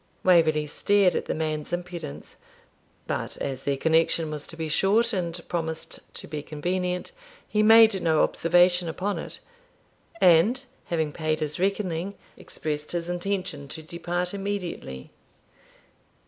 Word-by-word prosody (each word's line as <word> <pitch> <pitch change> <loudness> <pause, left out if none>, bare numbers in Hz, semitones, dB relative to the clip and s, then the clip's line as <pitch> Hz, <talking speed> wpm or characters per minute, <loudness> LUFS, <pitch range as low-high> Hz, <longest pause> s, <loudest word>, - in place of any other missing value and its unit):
Waverley 160 -4 +4
stared 195 +5 +3
at - - -2
the - - -2
man's 155 -1 -2
impudence, 175 -4 -6 0.7
but, - - -3
as 135 -1 -4
their 140 -1 +1
connection 160 +1 +2
was 150 -1 -6
to 165 - -9
be 160 -1 -3
short 215 +9 +2
and 175 -3 -2
promised 160 -2 -3 0.2
to - - -5
be 150 -1 -4
convenient, 180 - -2 0.4
he 210 - +1
made 220 -2 +7
no 160 -2 +3
observation 175 +1 +3
upon 195 +5 -2
it; - - -8 0.8
and, 185 +10 +5 0.2
having 160 -3 -1
paid 155 0 -1
his 150 0 -3
reckoning, 190 -1 -1 0.2
expressed 150 0 -4
his 170 0 -2
intention 175 -5 -2
to 155 +2 -7
depart 175 +2 -3
immediately. 190 - -5
170 Hz, 135 wpm, -26 LUFS, 155-185 Hz, 0.8 s, made